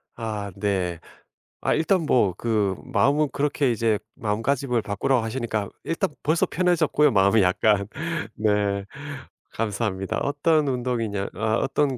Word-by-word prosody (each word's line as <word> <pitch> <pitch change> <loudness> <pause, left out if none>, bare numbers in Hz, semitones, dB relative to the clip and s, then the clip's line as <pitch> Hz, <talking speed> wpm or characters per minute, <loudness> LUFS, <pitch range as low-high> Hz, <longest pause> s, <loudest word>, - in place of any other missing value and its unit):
아 105 -3 -4
네. 90 -5 -1 0.6
아 - - +1
일단 170 +4 +2
뭐 105 -10 +3
그 105 -4 0
마음은 135 +6 +2
그렇게 145 -2 +1
이제 115 -1 +1 0.2
마음가짐을 120 +2 0
바꾸라고 110 +4 +1
하시니까 110 -3 -2
일단 165 - -1
벌써 160 +3 +2
편해졌고요 170 -4 +2
마음이 100 0 +4
약간. 100 +2 +2 0.5
네. 105 -2 +1 0.7
감사합니다. 105 -3 -2
어떤 150 +1 +2
운동이냐 120 -6 -1
아 110 +3 0
어떤 135 +1 0
115 Hz, 285 characters per minute, -24 LUFS, 100-140 Hz, 0.7 s, 마음이